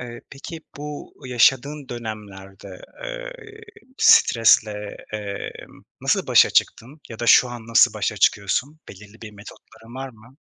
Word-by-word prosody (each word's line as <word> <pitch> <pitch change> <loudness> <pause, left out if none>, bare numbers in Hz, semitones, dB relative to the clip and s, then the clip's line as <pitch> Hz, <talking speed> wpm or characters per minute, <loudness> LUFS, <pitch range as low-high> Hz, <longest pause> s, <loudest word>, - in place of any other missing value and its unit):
Eee, 120 -1 -9
peki, 160 +4 -9 0.2
bu 145 0 -8
yaşadığın 135 +3 +1
dönemlerde, 100 -5 -9 0.2
eee, - - -7 0.5
iii, 260 +3 -28
stresle, 105 -3 +4 0.2
emm, 105 -2 -7 0.2
nasıl - - 0
başa - - +5
çıktın? 135 +7 -1
Ya 115 - -10
da 120 - -4
şu 125 - +6
an 120 -2 -9
nasıl 115 0 +4
başa - - -2
çıkıyorsun? 125 +10 0
Belirli 105 +3 -14
bir 110 - -9
metotların 110 +3 -15
var 135 +1 -6
mı? 120 +2 -19
115 Hz, 135 wpm, -22 LUFS, 105-135 Hz, 0.5 s, şu